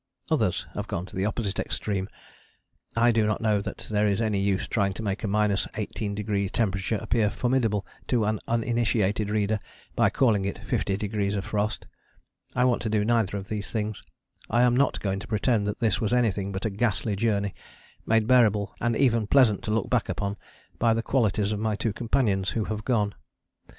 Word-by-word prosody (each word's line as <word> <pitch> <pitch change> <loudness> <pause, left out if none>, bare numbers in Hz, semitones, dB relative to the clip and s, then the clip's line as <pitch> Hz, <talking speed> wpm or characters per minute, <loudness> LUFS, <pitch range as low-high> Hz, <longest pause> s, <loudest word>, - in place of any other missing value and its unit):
Others - - +1
have - - -4
gone 85 - -3
to 95 - -12
the 95 +1 0
opposite 105 -2 -2
extreme. 100 -2 -2 0.9
I 120 +1 +4
do 110 -2 +2
not 105 - 0
know 105 -2 +2
that - - -6
there 105 0 +2
is 100 0 +1
any 110 -3 +1
use 100 -1 +1
in - - -7
trying 100 -3 +1
to 110 - -6
make 100 0 -2
a - - 0
18° 105 0 -1
temperature 100 -1 0
appear 110 -1 +1
formidable 115 -4 0 0.2
to 120 -4 +2
an 110 0 0
uninitiated 115 -3 +1
reader 105 0 +1 0.4
by - - +4
calling 110 -7 +2
it 100 - -3
fifty 95 - -1
degrees 105 -1 -1
of 95 -2 -3
frost. 105 +1 -2 0.7
I 125 - +3
want 125 -2 +2
to 110 - -2
do 105 -1 +1
neither 110 -4 +1
of 100 0 -7
these 105 -1 -4
things. 110 -2 -3 0.5
I 120 +2 +3
am 125 -1 +4
not 140 +3 +2
going 100 -1 -1
to - - -9
pretend 110 -1 +1
that 105 - -2
this 115 -3 +1
was 110 +1 0
anything 105 -5 +1
but 95 +2 -4
a 110 - 0
ghastly 105 0 0
journey, 100 -2 0 0.5
made 110 -1 +2
bearable 110 -4 +3
and 120 -1 +1
even 115 -4 +2
pleasant 120 -6 +4
to 105 - -1
look 110 -1 0
back - - +1
upon 100 0 -2 0.4
by 115 -1 +3
the 115 - -1
qualities 105 -6 +1
of 105 - -2
my 110 -1 0
two 110 0 -1
companions 110 -5 +1
who 110 - -1
have 110 0 -4
gone. 105 -5 +1
105 Hz, 195 wpm, -26 LUFS, 100-115 Hz, 0.9 s, I